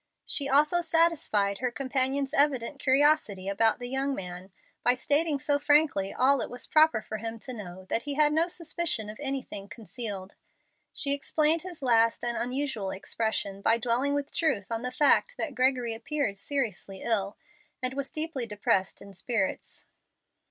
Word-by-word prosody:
She 280 -1 -1
also 300 +5 +4
satisfied 320 -12 +2
her 255 - 0
companion's 270 +2 0
evident 280 -2 +1
curiosity 265 -9 +2
about 220 +3 +2
the 245 - -7
young 270 +2 -1
man 180 -1 -7 0.3
by 245 - +4
stating 290 +3 +1
so 285 0 +1
frankly 290 -10 +3
all 265 +1 +3
it - - -3
was 245 0 -5
proper 310 -8 +4
for 215 - -5
him 225 +1 -5
to 255 +3 -8
know 185 -4 -9
that 225 - -1
he 285 +1 -4
had 300 0 +3
no 325 +2 +2
suspicion 335 -10 -2
of 215 - -14
anything 265 -8 -4
concealed. 205 -2 -6 0.6
She 280 - 0
explained 305 +3 +1
his 350 -4 -9
last 230 -2 +3
and 240 0 -1
unusual 250 -5 -2
expression 200 0 -3
by 225 +3 +3
dwelling 250 +4 +1
with 285 0 -3
truth 235 - 0
on 225 0 -2
the 250 0 -3
fact 305 - +3
that 300 - -2
Gregory 255 -2 +1
appeared 225 -3 -2
seriously 210 -8 -3
ill 205 -3 -1 0.4
and 255 0 -1
was 275 0 -3
deeply 310 -6 -3
depressed 200 -3 -1
in 200 0 -13
spirits. 195 0 -3
255 Hz, 165 wpm, -28 LUFS, 215-290 Hz, 0.6 s, also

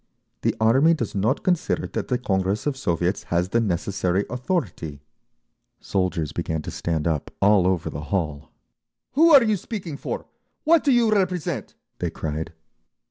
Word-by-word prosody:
"The - - +1
Army 135 +9 +5
does 115 -8 -3
not 110 +8 0
consider 180 -3 +1
that - - -4
the 125 - +1
Congress 95 -3 -1
of 145 -2 0
Soviets 90 -6 -1
has 85 +1 0
the 115 +3 +2
necessary 95 -1 0
authority—" 120 - -3 0.8
Soldiers 90 -5 -1
began 80 -1 -3
to - - -5
stand 80 -3 -2
up 80 -3 -1
all 100 -2 +4
over 95 -3 0
the 75 +2 -6
hall. 75 -5 -2 0.6
"Who 325 +5 +5
are 280 -4 +9
you 215 -2 +2
speaking 185 -6 -6
for? - - -5 0.4
What 325 0 +4
do 285 - +3
you 235 -3 +4
represent?" 180 - -1 0.2
they - - -1
cried. 80 +1 -4
100 Hz, 155 wpm, -24 LUFS, -, 0.8 s, are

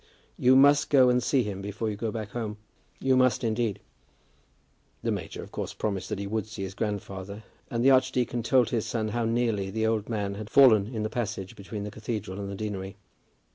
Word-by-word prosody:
You 130 +1 +4
must 140 +2 +6
go 130 -3 +6
and 125 0 +3
see 130 +1 +2
him 100 -2 -5
before 105 +2 -3
you - - -4
go 110 +2 -3
back 110 -2 -5
home; 110 -3 -4 0.4
you 130 0 +2
must 130 -3 +3
indeed." 115 -2 0 1.2
The - - 0
major, - - -5
of - - -13
course, - - -5
promised 100 -3 -3
that - - -2
he 100 - -4
would 110 +1 -2
see 110 -2 -6
his 95 0 -5
grandfather, 100 -1 -4 0.3
and 115 +1 -1
the 135 - +7
archdeacon 130 -2 +2
told 125 +1 +3
his 115 -2 -1
son 110 -1 -1
how 115 +2 -1
nearly 115 -4 0
the 110 +3 -1
old 110 -1 0
man 105 -3 -2
had 105 +1 -7
fallen 110 -7 +6
in 110 -3 -3
the 110 - -1
passage 95 -5 -4
between 100 +1 -6
the 105 - -5
cathedral 105 -3 -5
and 100 -1 -4
the 100 - -5
deanery. 100 -1 -5
110 Hz, 210 wpm, -27 LUFS, 100-120 Hz, 1.2 s, the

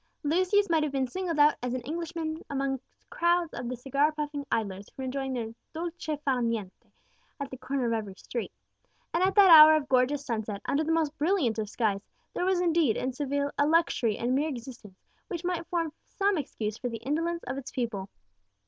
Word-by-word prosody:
Lucius 370 +7 +3
might 325 -2 +2
have 305 -2 -1
been 270 -1 0
singled 335 +5 -3
out 295 0 +6
as 250 0 -2
an 255 - -3
Englishman 320 +3 -4
amongst 270 -2 -2 0.3
crowds 345 -1 +1
of 240 -1 -4
the 255 - -3
cigar 275 +5 +1
puffing 295 -2 -4
idlers 200 -3 -2
who - - -32
were 265 - -4
enjoying 265 +1 -3
their 230 -3 -3 0.2
dolce 330 -2 -4
far 260 -3 +2
niente 225 -5 -3 0.5
at 280 -1 -5
the 260 - -6
corner 270 -2 -2
of 230 - +1
every 210 -4 -3
street. 235 +3 -5 0.6
And 335 - +1
at 380 +1 +2
that 395 -3 +8
hour 310 -1 +11
of 300 -2 -1
gorgeous 265 +2 +2
sunset, 220 -4 -3
under 295 +3 +1
the 320 - -1
most 320 -2 +1
brilliant 295 - +1
of 210 -2 -3
skies, 210 -3 0 0.3
there 360 - -1
was 375 -1 +2
indeed 330 -8 +2
in 260 0 -2
Seville 285 +1 -1
a 290 - +4
luxury 310 -9 +2
in 245 +2 0
mere 290 +4 +1
existence 235 -7 -9 0.3
which 350 -3 -5
might 350 -2 -2
form 330 -3 -1
some 400 0 0
excuse 225 - -4
for 250 - -2
the 230 -1 -7
indolence 330 +5 -1
of 270 - -4
its 270 - -8
people. 220 -6 -3
280 Hz, 200 wpm, -28 LUFS, 240-330 Hz, 0.6 s, hour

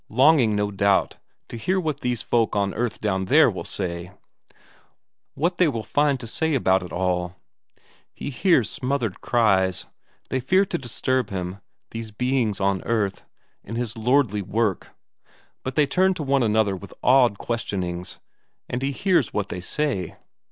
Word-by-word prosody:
Longing, 130 -2 +4
no 105 0 0
doubt, 100 0 +1 0.3
to 115 - -7
hear 185 - 0
what 155 -5 -2
these 125 -3 -2
folk 115 -3 +1
on 100 -1 0
earth 120 0 -3
down 95 -3 0
there - - +5
will - - -6
say; 85 -2 -4 1.2
what 175 +5 -1
they 180 - +5
will 115 -7 -2
find 145 +1 +1
to - - -7
say 160 +7 0
about 95 -7 +3
it 90 - -8
all. 90 -1 -1 0.8
He 145 - -6
hears 140 - +3
smothered 130 -6 -2
cries; 95 -6 +2 0.4
they 130 - 0
fear 185 +10 +3
to 170 -3 -3
disturb 130 -1 -1
him, 95 0 -4 0.3
these 115 -1 -6
beings 120 -1 0
on 95 -1 +1
earth, 105 -4 -1 0.4
in 115 - -7
his 120 -1 -3
lordly 115 -2 +2
work, 105 +1 -1 0.7
but 130 -1 -5
they 150 - +4
turn 185 +5 +2
to 160 - -4
one 135 -1 +2
another 110 -3 +2
with 100 +1 -11
awed 125 -5 +5
questionings, 90 -7 -4 0.5
and 125 - -3
he 135 +1 0
hears 185 - +1
what 100 -1 -1
they 90 - -5
say. 100 - -2
115 Hz, 160 wpm, -24 LUFS, 100-135 Hz, 1.2 s, there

